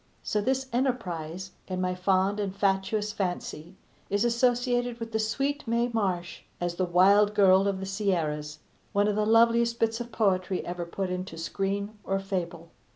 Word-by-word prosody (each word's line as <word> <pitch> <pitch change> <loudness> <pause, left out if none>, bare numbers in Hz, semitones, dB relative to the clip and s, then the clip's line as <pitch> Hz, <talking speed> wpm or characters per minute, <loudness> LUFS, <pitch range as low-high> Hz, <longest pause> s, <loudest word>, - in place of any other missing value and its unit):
So 210 - 0
this 265 +4 0
enterprise, 190 - -2 0.2
in 185 -1 -3
my 185 0 0
fond 190 +2 +1
and 195 -2 -2
fatuous 200 +2 0
fancy, 180 -3 -4 0.3
is 205 +3 +1
associated 245 0 +1
with 230 0 -6
the 220 - 0
sweet 275 +6 -1
Mae 235 +1 +1
Marsh 185 -6 -1 0.2
as 175 0 -1
The 185 +1 0
Wild 200 +4 +4
Girl 195 -1 +5
of 195 -1 -1
the 190 - -4
Sierras 165 -7 -1 0.4
one 205 0 +3
of 210 - +1
the 210 0 +1
loveliest 230 +1 +4
bits 225 +1 +1
of 240 0 -7
poetry 190 -4 0
ever 175 0 -4
put 185 +1 -3
into 180 -2 -5
screen 200 +5 -3
or 195 - 0
fable. 175 -4 -4
200 Hz, 165 wpm, -28 LUFS, 185-225 Hz, 0.4 s, Girl